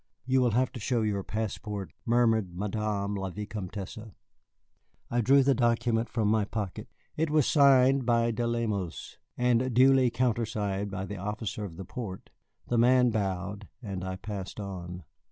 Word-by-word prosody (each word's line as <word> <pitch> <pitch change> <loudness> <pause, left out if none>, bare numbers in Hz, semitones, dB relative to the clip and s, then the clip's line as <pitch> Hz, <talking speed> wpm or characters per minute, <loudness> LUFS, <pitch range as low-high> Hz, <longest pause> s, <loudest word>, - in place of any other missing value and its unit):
"You 130 0 +3
will 120 -3 +2
have 130 0 +2
to 125 - -8
show 115 +1 0
your 105 -2 0
passport," 105 -4 -4
murmured 115 -6 +2
Madame 105 0 -2
la 95 -1 -3
Vicomtesse. 100 0 -6 1.1
I 120 0 +2
drew 135 +4 +5
the 135 +1 +4
document 120 -1 +1
from 110 -2 0
my 110 0 +3
pocket. 100 -2 -4 0.3
It 160 0 0
was 150 -3 +3
signed 135 -2 +5
by 115 -1 +2
De 115 +1 -1
Lemos, 110 -7 -3 0.2
and 125 +1 +2
duly 130 0 +6
countersigned 110 -5 -1
by 95 0 -4
the 105 0 -6
officer 105 +2 -4
of 85 -4 -9
the 95 - -7
port. 95 -3 -7 0.4
The 120 - +1
man 125 0 +5
bowed, 100 -1 -3 0.2
and 95 -4 -5
I 95 0 -3
passed 95 0 -6
on. 90 -3 -6
110 Hz, 155 wpm, -29 LUFS, 100-120 Hz, 1.1 s, duly